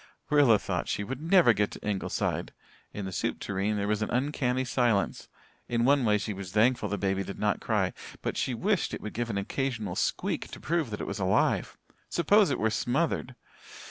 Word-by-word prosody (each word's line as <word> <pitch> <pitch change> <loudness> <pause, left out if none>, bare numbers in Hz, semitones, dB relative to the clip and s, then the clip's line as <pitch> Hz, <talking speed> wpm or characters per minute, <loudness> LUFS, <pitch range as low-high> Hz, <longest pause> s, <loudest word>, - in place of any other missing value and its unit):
Rilla 140 -7 +6
thought - - -3
she 100 - -1
would 130 +6 -5
never 165 -7 +5
get 105 -1 +1
to - - -8
Ingleside. 100 -2 -2 0.4
In 100 - -5
the 95 - -4
soup - - -2
tureen 100 +2 -1
there 100 0 -1
was 105 0 0
an 110 - -1
uncanny 130 -1 0
silence. 120 -5 0 0.4
In 120 0 +1
one 140 0 +4
way 105 -1 +4
she 105 0 -3
was 95 -2 -7
thankful 110 0 +2
the 105 - -1
baby 95 0 0
did 100 - -7
not 105 -2 0
cry - - 0 0.3
but - - -2
she 125 - -1
wished 200 - 0
it - - -9
would 105 - -6
give 120 +1 -2
an 100 - -2
occasional 110 -2 -2
squeak - - -1
to - - -9
prove 165 -4 -1
that 105 - -5
it - - -3
was - - -4
alive. 95 0 +1 0.3
Suppose 200 +4 +4
it - - 0
were 110 0 +1
smothered! 130 +2 -1
115 Hz, 205 wpm, -28 LUFS, 100-135 Hz, 0.4 s, Rilla